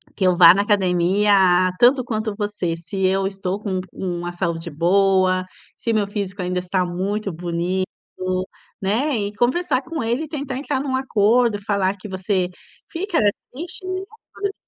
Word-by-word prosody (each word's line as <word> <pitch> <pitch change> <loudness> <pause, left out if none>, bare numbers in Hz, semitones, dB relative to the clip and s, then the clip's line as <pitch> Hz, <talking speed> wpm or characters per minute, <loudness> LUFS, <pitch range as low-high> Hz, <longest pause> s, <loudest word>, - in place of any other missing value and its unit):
que 195 - 0
eu 180 -1 +3
vá 170 -1 +10
na 200 - +2
academia 200 0 +2
a 185 -1 +5
tanto 255 +2 +6
quanto 220 -2 -2
você. 205 -5 -2
Se 190 +3 -3
eu 190 +1 +2
estou 195 0 -3
com 195 -3 -2
u - - -6
uma 175 0 -4
saúde 170 -1 -3
boa, 185 +3 +2 0.3
se 230 - -2
o - - +1
meu 210 -2 +1
físico 200 -1 -4
ainda 180 0 -1
está 180 0 0
muito 195 +4 -2
bonito", 175 +2 -2 1.0
né, 235 +8 +1
e 205 -1 -2
conversar 255 +5 +1
com 325 0 -4
ele 240 +7 -1
e - - -12
tentar 280 -4 -4
entrar 280 0 -2
num 270 -2 -2
acordo, 235 -3 +2
falar 200 -1 +1
que 195 - -9
você 190 -1 0 0.4
fica 350 +1 -2 0.4
triste, 340 - -4
né, 370 0 -2 0.3
quando 405 - -5
ele 400 - -1
200 Hz, 175 wpm, -21 LUFS, 185-240 Hz, 1.0 s, vá